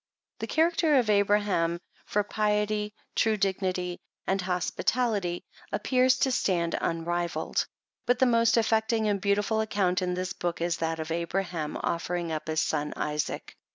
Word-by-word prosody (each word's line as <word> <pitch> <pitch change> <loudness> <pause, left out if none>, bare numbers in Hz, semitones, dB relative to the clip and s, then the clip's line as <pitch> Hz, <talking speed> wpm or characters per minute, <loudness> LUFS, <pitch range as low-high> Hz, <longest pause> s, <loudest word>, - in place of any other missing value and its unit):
The - - -3
character 325 -1 +3
of 240 -5 +3
Abraham, 200 -4 +2 0.3
for 210 - +1
piety, 210 0 0 0.2
true 220 -1 +2
dignity 185 -2 -1 0.3
and 190 0 +1
hospitality, 185 +1 0 0.3
ap - - -2
pears 255 0 +4
to 265 - +3
stand 175 -8 +1
unrivalled; 170 +1 -1 0.4
but 245 0 +4
the 260 - +4
most 230 -1 +4
affecting 220 0 +2
and 200 -2 0
beautiful 205 +2 +1
account 195 -4 +1
in 180 -1 -1
this 185 0 -3
book, 175 -1 -3
is 170 0 0
that 165 0 -2
of 160 +1 -4
Abraham 170 -2 -2
offering 170 0 -1
up 155 0 -4
his 155 0 +1
son 150 -1 -1
Isaac. 150 -1 -3
195 Hz, 150 wpm, -28 LUFS, 170-220 Hz, 0.4 s, pears